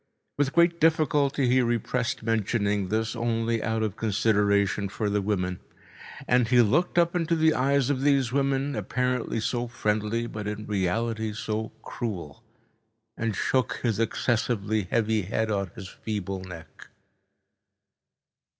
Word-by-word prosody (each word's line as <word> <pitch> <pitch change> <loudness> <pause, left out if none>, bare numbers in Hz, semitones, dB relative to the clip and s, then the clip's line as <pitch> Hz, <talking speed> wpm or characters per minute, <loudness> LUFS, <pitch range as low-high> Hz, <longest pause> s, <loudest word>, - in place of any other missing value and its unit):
With 145 -1 0
great 170 0 +4
difficulty 145 -4 +2
he 130 +1 +4
repressed 120 0 -1
mentioning 105 -3 0
this 110 +4 -1
only 115 0 0
out 110 0 -1
of 105 -2 -3
consideration 100 -2 +1
for 105 +1 -2
the 105 0 +1
women. 90 -3 -1 0.7
And 125 -1 +3
he 120 0 +5
looked 155 - +1
up 170 0 +3
into 170 -1 +1
the 160 -1 +4
eyes 140 0 +2
of 130 -2 -1
these 135 -4 +2
women, 140 +1 0
apparently 125 +3 -1
so 120 +2 -1
friendly 110 0 -1
but 105 -3 -6
in 105 0 -4
reality 110 +3 -1
so 110 +1 -3
cruel, 90 -11 -5 0.7
and 115 -2 -2
shook 130 +5 +1
his 115 -4 0
excessively 110 -3 0
heavy 110 -1 +1
head 110 +3 -1
on 100 -2 -1
his 100 -5 -8
feeble 100 -2 -4
neck. 85 -3 -11
115 Hz, 135 wpm, -26 LUFS, 105-125 Hz, 0.7 s, he